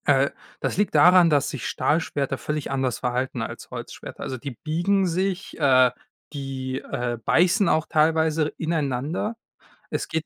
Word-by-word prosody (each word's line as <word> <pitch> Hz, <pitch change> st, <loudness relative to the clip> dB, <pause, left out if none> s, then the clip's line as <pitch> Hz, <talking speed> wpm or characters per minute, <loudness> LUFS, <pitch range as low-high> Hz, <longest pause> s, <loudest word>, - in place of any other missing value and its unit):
Äh, 140 Hz, -1 st, +4 dB, 0.3 s
das -, -, -2 dB
liegt 205 Hz, -5 st, +1 dB
daran, 175 Hz, +3 st, +7 dB
dass 145 Hz, -2 st, +2 dB
sich -, -, -5 dB
Stahlschwerter 145 Hz, -4 st, 0 dB
völlig 150 Hz, 0 st, -4 dB
anders 130 Hz, -3 st, -1 dB
verhalten 125 Hz, 0 st, -2 dB
als -, -, -6 dB
Holzschwerter. -, -, -8 dB
Also, 130 Hz, -, -4 dB
die 140 Hz, +3 st, -6 dB
biegen 175 Hz, -, 0 dB
sich, 185 Hz, +2 st, -2 dB
äh, 130 Hz, -4 st, +5 dB, 0.4 s
die, 135 Hz, -2 st, -4 dB
äh, 120 Hz, -3 st, -3 dB
beißen 180 Hz, +4 st, +3 dB
auch 160 Hz, 0 st, +2 dB
teilweise 160 Hz, -1 st, +2 dB
ineinander. 155 Hz, -, -2 dB, 0.5 s
Es -, -, -3 dB
geht 160 Hz, -1 st, -2 dB
150 Hz, 145 wpm, -24 LUFS, 135-165 Hz, 0.5 s, daran